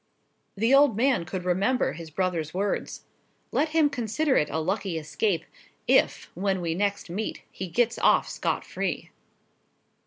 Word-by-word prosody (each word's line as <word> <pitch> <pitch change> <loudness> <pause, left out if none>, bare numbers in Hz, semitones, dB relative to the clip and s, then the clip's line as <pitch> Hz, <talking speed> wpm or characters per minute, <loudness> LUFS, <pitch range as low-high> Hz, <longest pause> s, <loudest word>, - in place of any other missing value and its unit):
The 225 +6 +3
old 275 -6 +5
man 245 -7 +2
could 180 0 -5
remember 195 +8 +1
his 165 0 -9
brother's 170 -1 -2
words: 200 +2 -2 0.5
"Let 310 - +1
him 315 -1 +4
consider 270 +2 0
it 150 - +2
a - - -2
lucky 185 +2 -1
escape, 165 +3 -1 0.4
if, - - +2
when 190 +1 0
we 170 -2 -1
next 200 +3 -1
meet, 210 +5 -4
he 190 - -5
gets 235 +7 +1
off - - +4
scot - - -2
free!" - - -3
195 Hz, 150 wpm, -26 LUFS, 175-240 Hz, 0.5 s, old